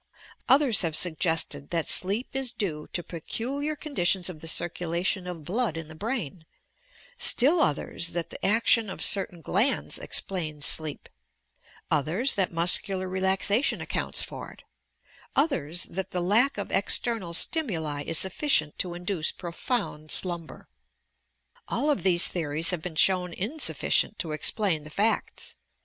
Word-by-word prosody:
Others 265 -4 +6
have 165 -4 +1
suggested 160 -4 +1
that 165 -2 -1
sleep 200 +7 +1
is 265 -3 0
due 175 -10 -4
to 175 - -1
peculiar 265 - -4
conditions 190 - 0
of 155 -4 -13
the 165 - -8
circulation 175 +3 -1
of 175 -3 -7
blood 215 - -1
in 165 -1 -7
the - - -9
brain; 190 - -4 0.8
still 305 +7 +4
others 155 +3 0
that 170 -1 -4
the - - -10
action 225 +1 +3
of - - -5
certain 190 -3 +1
glands 210 - 0
explains 155 -6 -1
sleep; 155 -2 0 0.8
others 170 - +2
that 190 -3 0
muscular 180 +3 +1
relaxation 190 +5 +1
accounts - - -1
tor - - -9
it; - - -19 0.7
others 180 - 0
that 190 +2 -5
the 180 - -3
lack 215 +10 +2
of - - -5
external 205 -8 +1
stimuli 165 - -1
is 165 +2 -1
suffi 190 - -3
cient 155 - +3
to 175 -2 -2
induce 175 -2 -2
profound 170 -3 -4
slumber. 170 -2 0 1.0
All 300 - 0
of 285 - -1
these 180 -2 +5
theories 160 -1 +2
have 180 -3 -2
been 165 -1 -6
shown 180 +1 +3
insufficient 220 - 0
to 160 - -3
explain 165 +2 +2
the 150 - -11
facta. 210 +8 -1
180 Hz, 140 wpm, -26 LUFS, 165-220 Hz, 1.0 s, Others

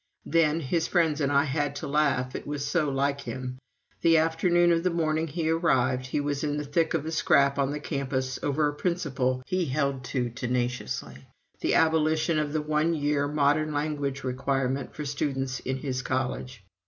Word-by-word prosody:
Then 165 -1 +2
his 160 +3 0
friends 160 -4 +2
and 140 -1 +1
I 140 0 +4
had 145 0 -1
to - - -5
laugh, 140 -3 +1
it - - -6
was 145 -1 -3
so 150 0 +1
like 140 +1 0
him 130 -1 -6 0.4
the 165 -1 +5
afternoon 170 +2 +3
of 165 0 +3
the 180 - +1
morning 160 -1 0
he 160 +1 -2
arrived, 130 -6 +1
he 130 - -1
was 145 0 -2
in 145 -1 -1
the 150 - -2
thick 160 +3 0
of 155 -2 -1
a 160 - -3
scrap 140 -3 +3
on 135 -1 +2
the 150 +1 -3
campus 130 -3 -2
over 145 +1 +1
a 145 - -2
principle 140 -7 -1
he 185 -1 0
held 140 -2 -1
to 125 -2 -2
tenaciously 120 - -3 0.3
the - - +1
abolition 160 0 +3
of 150 -1 -1
the 155 0 -1
one 155 +2 +1
year 145 -1 +1
modern 150 +1 +2
language 145 -2 -2
requirement 135 +1 -1
for 150 - -5
students 135 -2 -2
in 130 +1 -3
his 130 -1 -3
college. 130 -3 -3
145 Hz, 185 wpm, -27 LUFS, 130-155 Hz, 0.4 s, the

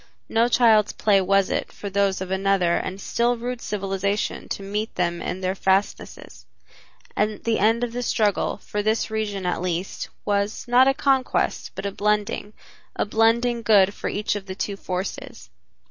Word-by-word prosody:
No 230 +1 +3
child's 225 -4 +4
play 200 -2 +3
was 195 +1 +2
it - - -2
for 205 - -8
those 195 -1 +1
of 190 0 -5
another 190 -2 +2
and 190 +1 -3
still 240 +4 0
rude 245 +1 -4
civilization 200 0 -2
to 200 - -4
meet 210 +3 -3
them 175 -1 -1
in 185 - -4
their 185 0 0
fastnesses, 195 +1 -2 0.7
and 210 0 -1
the 230 -1 +1
end 225 +4 +3
of 240 - -2
the 245 - -3
struggle 215 -4 0
for 210 0 -4
this 220 +1 0
region 205 -3 -2
at 180 -1 -1
least 180 +1 -3 0.2
was, 205 +3 -1
not 250 +2 +5
a 270 - +3
conquest, 270 -2 +1
but - - -6
a 200 - -1
blending, 210 +1 -1 0.4
a - - 0
blending 230 +3 +2
good 205 -3 +4
for - - -4
each 210 - -1
of 200 -1 -6
the 190 - -5
two 200 0 -3
forces. 185 - -6
205 Hz, 175 wpm, -23 LUFS, 195-225 Hz, 0.7 s, not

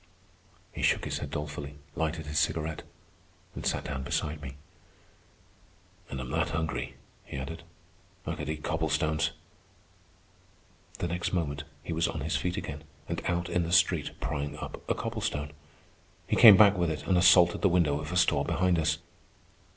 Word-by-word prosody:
He - - -7
shook - - +2
his - - -2
head 75 - -5
dolefully, 75 -1 -5 0.2
lighted 80 -1 -2
his 75 0 0
cigarette, 80 0 -1 0.7
and - - -7
sat - - 0
down 70 -3 -4
beside 75 +3 -2
me. 70 -2 -7 1.5
"And 65 - -5
I'm 65 -1 -5
that 85 +2 0
hungry," 80 -1 -3 0.3
he - - -8
added, 70 +6 -5 0.6
"I - - -2
could - - -5
eat 75 -1 -4
cobblestones." 80 0 0 1.7
The 85 - -2
next 90 +2 -2
moment 75 -4 -1 0.2
he 85 - -4
was 80 +1 +1
on 80 - -4
his 75 +3 -1
feet 90 0 -1
again 75 0 -5 0.2
and 85 0 -3
out 85 -1 0
in 90 0 0
the 85 0 -3
street 85 -3 +2
prying 70 0 -3
up - - -7
a - - +2
cobblestone. 75 0 -3 0.7
He - - 0
came 105 -5 +10
back 105 -2 +7
with 85 -3 +1
it 80 - -4
and 95 - +2
assaulted 90 -1 +6
the 100 - +4
window 80 -5 +2
of 75 +2 -6
a 90 - 0
store 90 - +3
behind 90 -2 +1
us. 75 -1 +1
80 Hz, 165 wpm, -29 LUFS, 75-85 Hz, 1.7 s, came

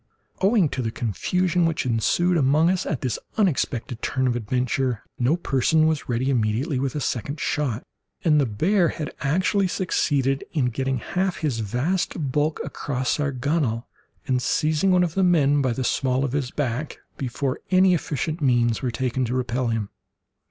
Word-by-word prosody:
Owing 195 -2 +4
to 130 - -3
the 115 - -1
confusion 170 - 0
which 160 -4 -1
ensued 130 +10 +2
among 155 +3 +3
us 185 -1 -1
at 155 -9 -2
this 125 -4 -2 0.2
unexpected 130 - 0
turn 130 -1 0
of 125 - +2
the - - -2
adventure, 125 +1 -1 0.2
no 130 +7 +2
person 155 0 +2
was 160 -4 0
ready 125 +3 0
immediately 125 +4 0
with 135 0 -2
a - - -1
second 140 +3 -3
shot, 135 -9 -1 0.4
and 150 -4 +4
the 135 - +1
bear 170 - +2
had 155 -2 -4
actually 185 +7 +2
succeeded 140 -7 0
in 130 -6 +1
getting 135 +1 -1
half 185 +9 -2
his 140 -8 -1
vast 135 - -1
bulk 150 +3 0
across 130 0 -2
our 145 -1 0
gunwale, 130 -3 -1 0.4
and 125 -1 +1
seizing 155 +7 +1
one 180 -1 +4
of 170 -3 -1
the 195 - +1
men 145 -5 +4
by 130 -2 +1
the 130 +2 -2
small 130 +2 +1
of 130 - -3
his 135 -2 -1
back, 140 +1 -3 0.2
before 130 0 -3
any 185 0 +5
efficient 160 0 -2
means 120 -4 +2
were 130 - -1
taken 130 +1 -1
to 120 +2 -2
repel 125 0 -1
him. 115 -3 -2
135 Hz, 175 wpm, -24 LUFS, 125-160 Hz, 0.4 s, any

